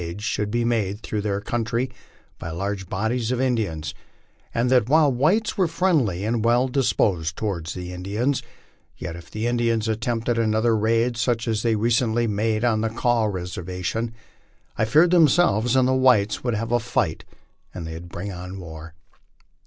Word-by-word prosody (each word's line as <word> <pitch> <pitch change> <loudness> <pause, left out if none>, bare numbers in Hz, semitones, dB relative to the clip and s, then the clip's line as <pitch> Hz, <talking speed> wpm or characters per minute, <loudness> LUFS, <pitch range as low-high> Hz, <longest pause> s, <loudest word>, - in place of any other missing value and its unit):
ids 85 +5 -6
should 105 -1 -1
be 120 +2 0
made 105 -4 0
through 105 -2 -3
their 100 -1 -1
country 115 +3 -1 0.5
by 80 - -5
large 95 +2 -4
bodies 110 +4 -1
of 125 - 0
Indians; 100 - -1 0.6
and 120 +2 0
that 125 -3 +3
while 150 -1 +5
the 125 - -3
whites 205 - +2
were 185 - +4
friendly 140 - +1
and 115 0 0
well 120 +2 +3
disposed 100 - +1
toward 95 -7 -3
the 90 +1 -5
Indians, 105 +9 -1 0.6
yet 85 - -6
if 85 -1 -11
the 110 +6 -4
Indians 115 -2 +1
attempted 115 +1 -1
another 110 +1 +2
laid 115 +2 +1
such 115 0 0
as 110 -2 0
they 115 -1 +2
re 115 +3 +1
cently 115 0 +2
made 110 +1 0
on 110 -3 +2
the 115 - 0
Kaw 115 0 +1
reservation, 90 +3 -3 0.6
I 110 - +1
feared 155 +10 +4
themselves 150 - +4
and 130 -1 +4
the 130 - +2
whites 125 -6 +3
would 120 -3 0
have 115 +2 -3
a 120 -1 +2
light, - - +1 0.5
and 85 - -7
that 80 - -6
it - - -6
would 85 - -12
bring 95 +4 -5
on 90 +1 -7
war. 80 -2 -10
110 Hz, 180 wpm, -23 LUFS, 100-120 Hz, 0.6 s, while